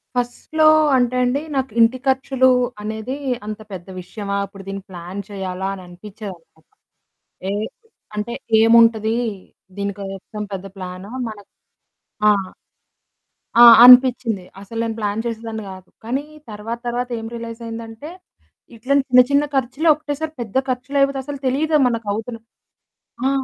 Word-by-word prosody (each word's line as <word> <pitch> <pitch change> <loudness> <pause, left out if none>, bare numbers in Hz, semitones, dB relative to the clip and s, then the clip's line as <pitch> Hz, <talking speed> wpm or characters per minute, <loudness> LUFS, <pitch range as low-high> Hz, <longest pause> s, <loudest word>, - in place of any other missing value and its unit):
ఫస్ట్‌లో 245 +6 +1 0.3
అంటే 250 0 +2
అండి 250 +3 +1 0.2
నాకు 265 -3 -1
ఇంటి 230 +3 +5
ఖర్చులు 265 0 +3 0.3
అనేది 220 +5 -4 0.3
అంత 215 0 -5
పెద్ద 185 -1 -8
విషయమా 200 +2 -5
ఇప్పుడు 195 0 -13
దీన్ని 195 0 -5
ప్లాన్ 180 +2 -7
చేయాలా 190 -1 -4
అని 190 - -8
అనిపిచ్చేదనమాట. 180 -3 -11 0.9
ఏహ్! 210 +2 -2 0.5
అంటే 210 +3 -3 0.3
ఏముంటది 225 -1 +5 0.6
దీని 200 0 -2
కోసం 195 +2 -7
పెద్ద 195 0 -5
ప్లానా 185 +1 -7 0.2
మన 215 -1 -7 0.9
ఆ! - - +8 1.3
ఆ! - - +11 0.2
అనిపిచ్చింది. 245 -6 +6 0.2
అసల 225 +3 -7
నేను 225 -1 -3
ప్లాన్ 210 +1 -2
చేసేదాన్ని 225 -1 -5
కాదు, 185 -1 -12 0.2
కానీ 265 +5 -2 0.3
తర్వాత 220 +3 -5
తర్వాత 245 +1 -2
ఏం 225 - -6
రియలైజైయిందంటే 230 +2 -7 0.7
ఇట్లాంటి 270 +4 +1
చిన్న 250 0 +9
చిన్న 285 +1 +4
ఖర్చులు 270 +5 0
ఒక్కటేసారి 305 +1 -5
పెద్ద 230 +1 -3
ఖర్చులు 255 +2 -2
అయిపోతే 275 0 +2
అసలు 290 0 -5
తెలీదు 305 +5 +1
మనకు 230 -3 -2
అవుతున్న 230 +2 -5 0.9
ఆ! - - +3
225 Hz, 130 wpm, -20 LUFS, 200-255 Hz, 1.3 s, ఆ